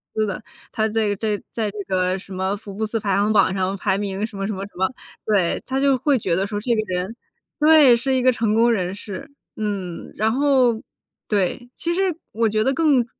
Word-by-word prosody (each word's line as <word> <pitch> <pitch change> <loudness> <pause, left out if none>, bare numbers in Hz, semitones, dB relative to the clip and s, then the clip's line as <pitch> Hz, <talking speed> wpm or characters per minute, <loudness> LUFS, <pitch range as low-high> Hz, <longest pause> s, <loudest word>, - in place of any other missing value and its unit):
司 215 0 +2
的， 200 +1 -4 0.3
他 220 -2 0
这 215 -1 0
个 205 - 0
这 210 -1 -1
个 - - -17
在 220 -3 -1
这 210 - -10 0.2
个 185 0 +1
什 190 0 -10
么 190 +2 -1
福 200 -1 -10
布 220 +2 -2
斯 225 +1 -2
排 200 -2 0
行 205 +2 +2
榜 195 -2 +4
上 190 0 -1
排 190 0 0
名 200 0 -2
什 210 -3 -9
么 195 0 -2
什 215 - -2
么 195 +1 -5
什 205 - -14
么， 190 - +2 0.4
对， 195 -5 +1
他 265 +1 -1
就 275 -2 +4
会 275 +1 +2
觉 190 -6 -1
得 195 +2 0
说 205 0 -3
这 235 +1 +1
个 215 - +1
人 185 +6 -3 0.4
对， 300 -4 +7
是 260 +2 0
一 255 - +2
个 255 0 +5
成 225 -3 0
功 235 +1 +4
人 185 -3 -1
士， 205 +6 -8 0.3
嗯， 200 -5 -4
然 220 +1 +1
后 255 -4 +3 0.5
对， 210 +4 0
其 340 0 -1
实 375 -2 +1 0.2
我 225 +1 +1
觉 215 +1 +1
得 270 - +2
更 275 -5 +3
215 Hz, 250 characters per minute, -22 LUFS, 195-245 Hz, 0.5 s, 对